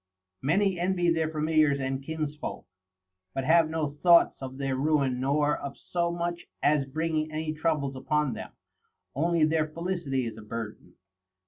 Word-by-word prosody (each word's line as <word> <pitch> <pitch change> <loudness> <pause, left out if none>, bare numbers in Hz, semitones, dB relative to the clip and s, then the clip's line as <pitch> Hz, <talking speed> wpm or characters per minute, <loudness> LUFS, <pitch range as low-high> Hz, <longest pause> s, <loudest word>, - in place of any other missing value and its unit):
Many 185 +5 +2
envy 175 -1 +2
their 160 -1 0
familiars 155 -2 +2
and 135 0 -2
kinsfolk, 150 0 -4 0.7
but 135 - -1
have 160 +2 +4
no 160 -2 -1
thoughts 170 -1 +6
of 130 0 -6
their 135 -1 -1
ruin 135 -2 +1
nor 145 +3 +2
of 140 - -7
so 170 -1 -1
much 170 0 -3 0.2
as 145 -1 +3
bringing 155 +2 -1
any 155 0 -2
troubles 150 -4 -1
upon 150 0 0
them; - - -7 0.6
only 165 +3 +2
their 155 0 +1
felicity 165 -5 -2
is 110 -1 -6
a - - -9
burden. 110 0 -7
155 Hz, 150 wpm, -28 LUFS, 135-165 Hz, 0.7 s, thoughts